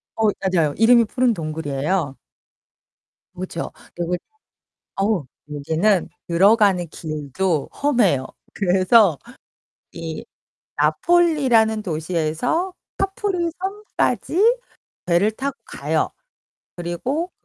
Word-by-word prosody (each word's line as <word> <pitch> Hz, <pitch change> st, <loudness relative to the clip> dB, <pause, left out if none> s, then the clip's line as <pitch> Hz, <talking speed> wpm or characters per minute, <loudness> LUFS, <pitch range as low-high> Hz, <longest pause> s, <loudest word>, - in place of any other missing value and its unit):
어, 220 Hz, -1 st, +2 dB, 0.2 s
맞아요. 170 Hz, -6 st, +2 dB
이름이 235 Hz, +1 st, +6 dB
푸른 250 Hz, +1 st, +1 dB
동굴이에요. 155 Hz, -2 st, -2 dB, 1.2 s
그렇죠. 175 Hz, -2 st, -5 dB, 0.2 s
그리고 175 Hz, +1 st, -1 dB, 0.8 s
어우 195 Hz, -6 st, 0 dB, 0.3 s
여기는 160 Hz, +7 st, +1 dB, 0.2 s
들어가는 195 Hz, +1 st, +4 dB
길도 155 Hz, +1 st, -2 dB
험해요. 210 Hz, -, +2 dB, 0.3 s
그래서 190 Hz, -, +4 dB, 0.7 s
이 165 Hz, -2 st, -6 dB, 0.5 s
나폴리라는 270 Hz, -11 st, +3 dB
도시에서 170 Hz, -, -1 dB, 0.3 s
카프리섬까지 390 Hz, +3 st, 0 dB, 0.5 s
배를 180 Hz, +5 st, +3 dB
타고 270 Hz, +5 st, -4 dB
가요. -, -, -1 dB, 0.7 s
그리고 250 Hz, -, -3 dB
195 Hz, 215 characters per minute, -21 LUFS, 165-255 Hz, 1.2 s, 이름이